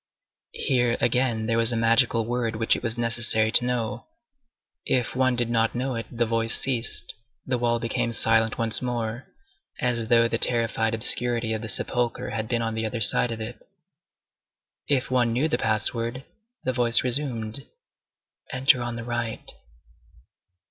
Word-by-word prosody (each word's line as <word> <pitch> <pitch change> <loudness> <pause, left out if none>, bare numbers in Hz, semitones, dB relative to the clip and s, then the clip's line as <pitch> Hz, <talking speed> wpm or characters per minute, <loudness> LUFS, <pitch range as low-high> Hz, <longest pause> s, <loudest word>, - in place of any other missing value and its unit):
Here, 120 -2 +1
again, 120 -3 0
there 115 +1 +1
was 115 +1 +5
a - - -1
magical 115 0 +2
word 120 -1 -2
which 115 +1 +2
it - - -5
was 115 -1 -2
necessary 115 -2 +2
to 120 - +4
know. 115 -2 -3 0.8
If 125 -2 -1
one 130 -1 +2
did 120 -1 0
not 115 0 +1
know 130 +2 -2
it, 115 -2 -5
the 120 -1 -1
voice 115 0 +1
ceased, 125 -3 0 0.3
the 125 -2 -1
wall 120 0 +1
became 115 0 -2
silent 115 -1 +1
once 115 -1 +1
more, 120 -1 -4 0.5
as 120 -2 -1
though 115 0 +4
the 115 0 -2
terrified 115 -2 0
obscurity 115 0 +2
of 110 - -3
the 115 - -6
sepulchre 120 +2 -1
had 110 -1 -3
been 115 0 -1
on 115 0 -2
the 110 0 -3
other 115 +1 -4
side 115 +3 +4
of 115 - -5
it. 110 0 -7 1.3
If 135 -3 +1
one 120 -2 +2
knew 135 +7 +1
the 160 - -1
password, 115 +3 -1 0.4
the 130 - -1
voice 120 -1 +2
resumed, 125 -2 -2 0.8
"Enter 130 -1 +3
on 120 -1 -4
the 120 - -6
right." 120 -1 -4
115 Hz, 160 wpm, -25 LUFS, 115-125 Hz, 1.3 s, was